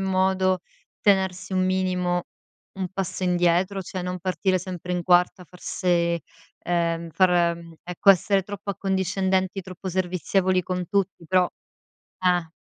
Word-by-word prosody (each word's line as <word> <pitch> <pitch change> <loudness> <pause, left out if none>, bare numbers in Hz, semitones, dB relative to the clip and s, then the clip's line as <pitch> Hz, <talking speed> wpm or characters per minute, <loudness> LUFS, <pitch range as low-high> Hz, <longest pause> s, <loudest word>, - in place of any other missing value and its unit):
modo, 190 -1 +1 0.4
tenersi 190 -2 +1
un 185 0 +2
minimo 180 -1 0 0.5
un 190 - -1
passo 190 -1 -3
indietro, 180 +2 +2
cioè 185 0 -5
non 180 0 -4
partire 185 +1 0
sempre 180 0 -6
in 175 -1 -1
quarta 180 +1 +3
a - - -14
far 180 +2 -17
se 170 -2 0 0.4
ehm, 170 -1 -1
far 175 0 +3
mhmm, 165 -1 -12
ecco, 180 +3 +4
essere 195 +1 +3
troppo 205 +1 -6
accondiscendenti, 190 0 0
troppo 185 +1 -8
servizievoli 185 +1 +1
con 180 0 -3
tutti, 195 -4 -1
però 185 0 +3 0.7
eh. 180 -2 +2
185 Hz, 140 wpm, -24 LUFS, 175-190 Hz, 0.7 s, ecco